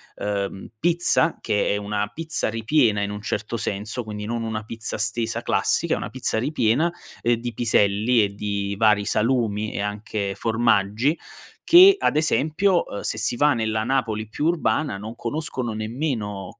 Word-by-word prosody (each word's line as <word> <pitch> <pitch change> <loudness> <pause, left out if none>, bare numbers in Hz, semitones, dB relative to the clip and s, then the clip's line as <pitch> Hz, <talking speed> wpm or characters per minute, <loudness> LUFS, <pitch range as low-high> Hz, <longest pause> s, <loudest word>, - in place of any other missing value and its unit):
ehm, 100 -1 -4
pizza, 170 +4 +2
che 105 - 0
è - - 0
una 105 0 -2
pizza 160 -5 -2
ripiena 115 -1 +2
in 100 0 -2
un 105 0 -6
certo 105 +2 -3
senso, 105 +2 -3
quindi 105 -1 -6
non 115 +1 -3
una 110 -1 -3
pizza 115 0 -5
stesa 110 +2 -1
classica, - - 0 0.3
è - - 0
una - - -5
pizza - - -2
ripiena, 140 +4 +1 0.3
ehm, 120 0 +2
di 120 +1 -5
piselli 110 0 +2
e 100 -1 -2
di 100 -1 -3
vari 105 -2 +3
salumi 110 -2 0
e - - -4
anche 105 -1 -3
formaggi 115 +4 +1 0.5
che, 375 +3 +8
ad 150 - +1
esempio, 160 +4 +2
ehm, 100 - -5
se - - -2
si 110 +2 0
va 145 +2 +4
nella 110 -2 -1
Napoli 115 -4 -1
più 145 +8 -2
urbana 155 - 0
non 110 +3 -8
conoscono 130 -2 -3
nemmeno, 110 - -4
110 Hz, 165 wpm, -23 LUFS, 105-130 Hz, 0.5 s, che